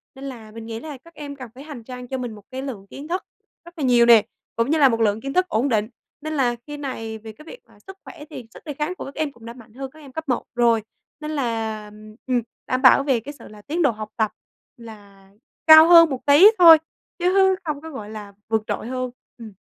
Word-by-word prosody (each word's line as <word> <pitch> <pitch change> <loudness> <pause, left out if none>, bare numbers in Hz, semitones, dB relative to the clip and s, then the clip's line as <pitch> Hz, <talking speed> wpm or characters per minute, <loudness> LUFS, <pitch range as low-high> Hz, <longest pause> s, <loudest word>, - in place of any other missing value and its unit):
Nên 265 - -11
là 230 -5 -9
mình 225 +1 -10
nghĩ 225 0 -6
là 300 +1 -8
các 335 +6 -20
em 290 -3 -8
cần 255 -4 -10
phải 270 - -11
hành 290 -6 -10
trang 250 +1 -9
cho 265 +1 -4
mình 245 -3 -5
một 210 - -15
cái 260 +1 -5
lượng 220 -8 -7
kiến 280 +7 -10
thức 360 +3 -3 0.4
rất 345 - -14
là 300 - -4
nhiều 245 -2 +4
nè, 230 -3 +7 0.3
cũng 230 +3 0
như 320 - +3
là 280 -3 +6
một 230 -1 -1
lượng 215 0 +1
kiến 275 +2 -5
thức 365 0 +2
ổn 275 -4 0
định. 215 -3 +1 0.3
Nên 310 +1 -5
là 250 -5 +1
khi 295 - -7
này 225 -6 -6
về 220 0 -10
cái 305 +8 -17
việc - - -11
là - - -22
sức 385 - -10
khỏe 295 - -11
thì 245 - -9
sức - - -14
đề 300 - -5
kháng 300 +5 -3
của - - -8
các 275 - -10
em 310 -2 -2
cũng 235 -3 -17
đã 230 - -8
mạnh 230 -3 -17
hơn 265 +1 -7
các 315 - -17
em 280 -3 -14
cấp 320 +1 -7
1 250 - 0
rồi, 235 -2 +3 0.4
nên 305 0 -6
là, 225 -6 -3 0.4
ừm, 250 -2 +1 0.3
đảm 255 0 -1
bảo 265 +1 +6
về 270 -4 +1
cái 280 +6 -9
sự - - -12
là 210 0 -14
tiến 325 +9 -3
độ 280 - +3
học 215 -1 -8
tập 220 -2 +1 0.5
là 205 -4 -14 0.4
cao 315 +1 +10
hơn 335 -2 +8
một 265 -3 -5
tí 290 +7 +8
thôi 335 -3 +9 0.4
chứ 360 +1 +1 0.3
không 300 -3 -4
có, 320 - -9
gọi 220 -9 -8
là, 210 -2 -9
vượt 220 -1 0
trội - - -4
hơn. 255 -1 -4 0.3
Ừm. 225 -2 -10
255 Hz, 260 wpm, -22 LUFS, 225-295 Hz, 0.5 s, cao